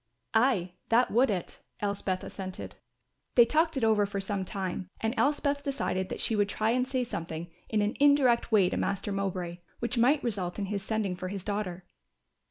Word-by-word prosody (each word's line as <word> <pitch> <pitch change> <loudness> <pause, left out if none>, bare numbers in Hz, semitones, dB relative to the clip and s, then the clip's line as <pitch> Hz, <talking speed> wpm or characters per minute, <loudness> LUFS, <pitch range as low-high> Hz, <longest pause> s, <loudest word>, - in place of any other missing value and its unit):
"Ay, 220 -6 +3 0.2
that 240 +2 +4
would 250 +4 +4
it," 185 -4 -3 0.2
Elspeth 200 -2 -1
assented. 190 -1 -6 0.6
They 240 - +8
talked 315 +4 +2
it 260 - -1
over 215 -2 +4
for 200 0 -3
some 195 0 -2
time 185 -1 -4
and 225 +1 0
Elspeth 285 0 +1
decided 225 -10 -2
that - - -4
she 225 - +1
would 205 -1 +2
try 215 +2 +1
and 250 +1 +1
say 260 -1 0
something 165 -5 -5 0.2
in 215 -1 +2
an 210 - -1
indirect 280 -5 +4
way 200 -4 +5
to - - -1
Master 200 +1 -1
Mowbray, 185 -3 -3 0.2
which 235 0 -2
might 275 +5 +4
result 190 -7 -2
in 205 - -1
his 200 0 -3
sending 210 -2 -1
for 185 +1 -5
his 195 -1 -5
daughter. 195 -4 -3
205 Hz, 185 wpm, -29 LUFS, 190-240 Hz, 0.6 s, They